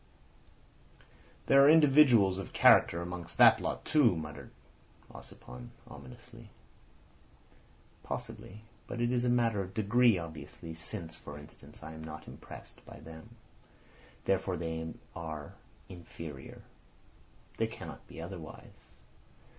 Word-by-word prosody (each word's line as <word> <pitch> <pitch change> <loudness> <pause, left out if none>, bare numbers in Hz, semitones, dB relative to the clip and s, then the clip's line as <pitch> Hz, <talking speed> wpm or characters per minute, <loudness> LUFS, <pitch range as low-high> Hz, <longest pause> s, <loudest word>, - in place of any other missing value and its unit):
"There 140 0 +6
are 140 - +7
individuals 135 -11 +6
of 95 - -7
character 85 +1 +5
amongst 85 -1 -7
that - - +7
lot - - -3
too," 140 - +4
muttered 75 -2 -7 0.6
Ossipon 60 -1 -11 0.2
ominously. 60 - -13 1.5
"Possibly. 105 +3 -7 0.2
But 125 - -5
it 120 0 +1
is 125 -1 +1
a - - +2
matter 115 -4 +2
of 95 0 -8
degree 115 +1 +4
obviously, 80 0 -8
since, 85 0 -7
for 75 -2 -10
instance, 75 +1 -14
I 80 - -8
am 80 0 -9
not 75 -1 -9
impressed - - -12
by - - -12
them. 80 -1 -12 0.9
Therefore 95 -1 0
they 80 -1 -4 0.2
are 80 -3 -6 0.3
inferior. 85 -5 -10 0.9
They - - +1
cannot - - -10
be - - -11
otherwise. 85 -1 -10
85 Hz, 115 wpm, -31 LUFS, 80-115 Hz, 1.5 s, are